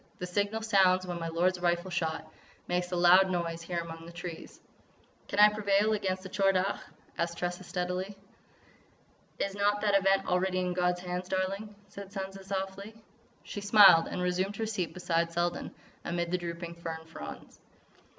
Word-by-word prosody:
The 180 - -4
signal 205 +4 -1
sounds 190 -4 +4
when 175 -1 -4
my 165 - -3
lord's 175 +3 +1
rifle 175 +1 0
shot 160 -2 -2 0.4
makes 180 0 -1
a - - -1
loud 180 +2 +6
noise 170 -2 -2
here 175 +1 -4
among 165 -1 -8
these 170 +1 -12
trees." 175 -2 -8 0.7
"Can - - -5
I 210 0 +9
prevail 210 0 +2
against 190 -3 -2
the 190 - -7
Tchor 195 0 +2
Dagh?" 190 +2 0 0.4
asked 170 0 -1
Tressa, 175 +1 -3
steadily. 180 +2 -3 1.2
"Is 195 - -2
not 205 +1 +1
that 205 -2 +2
event 195 0 +3
already 185 +1 +1
in 180 -1 0
God's 180 0 0
hands, 180 0 -4
darling?" 195 +3 -2
said 200 0 -10
Sansa 195 -1 -6
softly. 195 +2 -5 0.5
She 205 - -6
smiled 200 -5 +7
and 180 - -3
resumed 185 +3 0
her 225 - -2
seat 200 -6 -2
beside 170 -2 0
Selden, 175 +1 -1 0.3
amid 170 0 -2
the 180 - +2
drooping 170 0 -5
fern 165 -1 -6
fronds. 75 - -10
185 Hz, 170 wpm, -30 LUFS, 175-195 Hz, 1.2 s, I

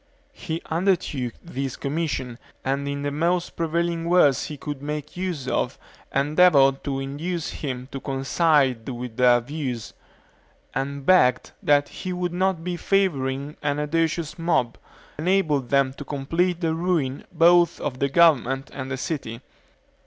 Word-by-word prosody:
He 165 -11 -5
undertook 165 - 0
this 135 -6 -4
commission, 140 -5 -3 0.3
and 140 +1 -1
in 140 0 -3
the 145 - -1
most 170 +4 0
prevailing 170 0 -1
words 160 -7 +4
he 150 - -6
could 145 -1 -6
make 150 0 -5
use 175 -7 -3
of - - -1 0.3
endeavored 140 -1 +4
to 135 -1 -1
induce 150 +5 -3
him 130 -3 -5
to 135 - -5
coincide 135 -2 +1
with 120 -2 -6
their 125 -1 +5
views; 125 -3 -5 0.8
and 140 0 -3
begged 125 -9 +4
that 145 -1 +3
he 185 -1 -6
would 180 -1 -2
not 185 -2 0
by 175 0 -3
favoring 145 -8 0
an 145 -1 0
audacious 160 +1 -1
mob, 165 -8 0 0.4
enable 170 -3 +2
them 135 +1 +1
to 145 - -8
complete 165 +6 -1
the 165 -2 +1
ruin 165 -6 -1
both 175 0 +4
of 130 -3 -4
the 140 - +1
government 135 -4 +3
and 130 -1 -5
the 135 - -3
city. 130 -6 -4
145 Hz, 145 wpm, -24 LUFS, 135-170 Hz, 0.8 s, their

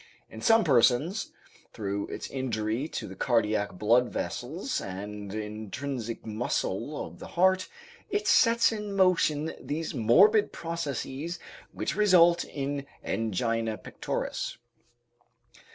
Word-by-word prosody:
In - - -9
some 225 -1 +5
persons, 140 - +3 0.4
through 100 -1 -3
its - - -6
injury 120 0 -2
to - - -5
the 95 - -9
cardiac 110 -2 +1
blood 115 +6 +3
vessels 160 - -3
and 100 +1 -6
intrinsic 110 +3 -5
muscle 115 +3 -2
of - - -12
the - - -8
heart, 185 +1 +2 0.4
it 415 +1 -1
sets 230 -1 +5
in 210 -2 -4
motion 165 -5 +2
those 155 +2 -3
morbid 195 - +5
processes 165 -1 -4 0.3
which - - -3
result 175 -4 +5
in 140 0 -4 0.2
angina 115 +1 -1
pectoris. - - -4
135 Hz, 110 wpm, -28 LUFS, 110-175 Hz, 0.4 s, some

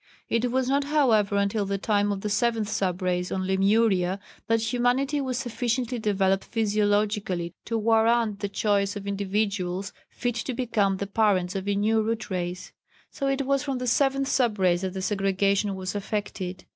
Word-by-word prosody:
It 230 +2 +1
was 260 0 +1
not, 275 +1 +1
however, 235 -9 +3
until 200 0 0
the 200 0 -1
time 205 0 +1
of 195 -1 -3
the 210 - -2
seventh 225 -2 +1
sub 185 -2 -1
race 180 0 -1
on 185 0 -1
Lemuria 190 -1 +2 0.3
that 225 0 +1
humanity 265 +4 +1
was 260 -2 -2
sufficiently 245 -1 -2
developed 195 -2 +1
physiologically 205 -4 0
to 230 - -1
warrant 225 -1 +2
the 200 -1 -3
choice 200 0 0
of 200 -1 -6
individuals 200 -2 -2 0.2
fit 245 -1 -2
to 245 +2 -3
become 215 -6 +1
the 200 - -3
parents 200 -3 +1
of 195 0 -3
a 200 - +1
new 220 +2 +2
Root 220 -1 -3
Race. 180 0 -4 0.4
So 275 - -3
it 275 0 0
was 275 0 +1
from 275 -3 -2
the 250 - -4
seventh 270 +2 +2
sub 240 -6 +1
race 180 -2 +2
that 190 -1 -3
the 190 -1 -4
segregation 195 0 +1
was 185 -1 -4
effected. 200 -3 -4
205 Hz, 175 wpm, -26 LUFS, 195-235 Hz, 0.4 s, however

